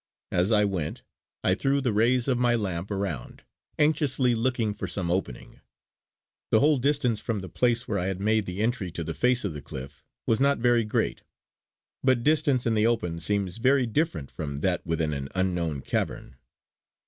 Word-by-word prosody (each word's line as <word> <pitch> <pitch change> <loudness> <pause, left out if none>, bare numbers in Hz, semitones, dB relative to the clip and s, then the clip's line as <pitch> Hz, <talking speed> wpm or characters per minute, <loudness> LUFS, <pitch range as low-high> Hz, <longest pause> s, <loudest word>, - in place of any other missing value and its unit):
As 90 +5 +1
I 105 -1 +4
went, 90 -7 -3 0.4
I 95 - +3
threw 135 +7 +1
the 125 -5 0
rays 120 +4 +2
of 125 -3 +1
my 120 -1 +3
lamp 95 -4 -3
around, 95 - -4 0.3
anxiously 145 -4 +2
looking 115 -2 0
for - - -5
some 90 -3 -3
opening. 90 -9 -4 0.9
The 110 - +4
whole 145 +1 +4
distance 130 -4 +1
from 110 -4 -2
the 95 - -7
place 120 0 +1
where 100 -2 -1
I 90 - -1
had 95 -1 -3
made 110 0 +1
the 90 +3 -4
entry 115 -5 -1
to 85 - -3
the 80 +1 -4
face 125 +2 +1
of 95 - -2
the 75 - -7
cliff 70 +1 -9 0.2
was 115 - +2
not 140 +1 +3
very 120 -1 +3
great; 105 - -1 0.8
but 130 -3 +3
distance 145 -4 +2
in 115 - +2
the 110 +1 +3
open 90 -8 -1
seems 100 +2 0
very 130 +2 +3
different 115 - -1
from 70 -3 -5
that 90 0 0
within 80 -2 0
an 70 -1 -4
unknown 90 -6 -1
cavern. 65 -1 -3
105 Hz, 185 wpm, -27 LUFS, 90-125 Hz, 0.9 s, I